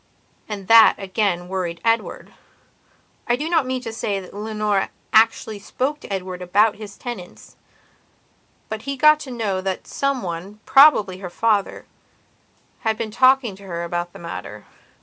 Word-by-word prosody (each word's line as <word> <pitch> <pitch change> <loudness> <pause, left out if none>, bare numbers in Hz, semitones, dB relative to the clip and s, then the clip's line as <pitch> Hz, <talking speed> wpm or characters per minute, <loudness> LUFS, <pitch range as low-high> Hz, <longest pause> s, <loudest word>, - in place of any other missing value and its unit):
And 200 -3 -6
that, 225 -1 +8
again, 190 -2 -1
worried 180 -3 -3
Edward. 230 0 -1 0.9
I 240 - +3
do 295 +5 -4
not 325 -6 +1
mean 255 0 -2
to 225 -2 -6
say 205 -3 -2
that 185 - -12
Leonora 210 -1 -1 0.2
actually 220 -1 +3
spoke 265 +8 -3
to - - -12
Edward 185 -2 -4
about 205 +4 +2
his 205 -2 -10
tenantsbut 235 -8 -9 1.2
he 275 +2 -5
got 305 +2 +6
to 280 - -8
know 215 -6 -2
that 190 -1 -3
some 275 -3 -2
one, 180 +4 -6
probably 215 -10 +5
her 185 -2 -6
father, 210 +1 0 0.9
had 220 -1 -1
been 225 -2 -4
talking 255 -3 +3
to 200 - -15
her 170 -1 -4
about 175 0 -3
the - - -12
matter. 105 -11 -8
210 Hz, 150 wpm, -21 LUFS, 185-240 Hz, 1.2 s, that